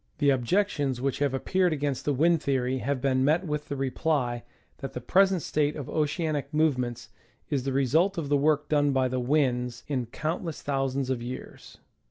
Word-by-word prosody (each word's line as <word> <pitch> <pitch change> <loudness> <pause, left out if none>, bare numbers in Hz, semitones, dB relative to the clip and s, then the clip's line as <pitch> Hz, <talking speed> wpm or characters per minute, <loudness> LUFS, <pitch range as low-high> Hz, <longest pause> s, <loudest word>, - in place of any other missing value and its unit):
The 145 -2 +3
objections 140 - 0
which 135 +1 -1
have 145 -1 +1
appeared 180 +6 +1
against 145 -3 -2
the 145 - +2
wind 165 +3 +3
theory 130 -1 0
have 135 0 -2
been 130 -1 +2
met 160 +6 +2
with 150 -1 -3
the 145 - -3
reply 135 -2 -1 0.4
that 135 - -6
the - - -4
present 190 +6 +3
state 150 0 0
of 145 -4 -6
oceanic 150 -2 -1
movements 125 -6 0 0.4
is 135 -3 0
the 135 - 0
result 155 +9 +2
of 160 -4 -2
the 145 - +2
work 150 +1 +2
done 145 -2 +2
by 130 -1 +2
the 130 0 -2
winds 125 -2 0
in 130 -5 -2
count 155 +9 -3
less 165 -3 -5
thousands 135 -1 -1
of 125 -2 -2
years. 125 +2 -8
140 Hz, 190 wpm, -27 LUFS, 130-155 Hz, 0.4 s, The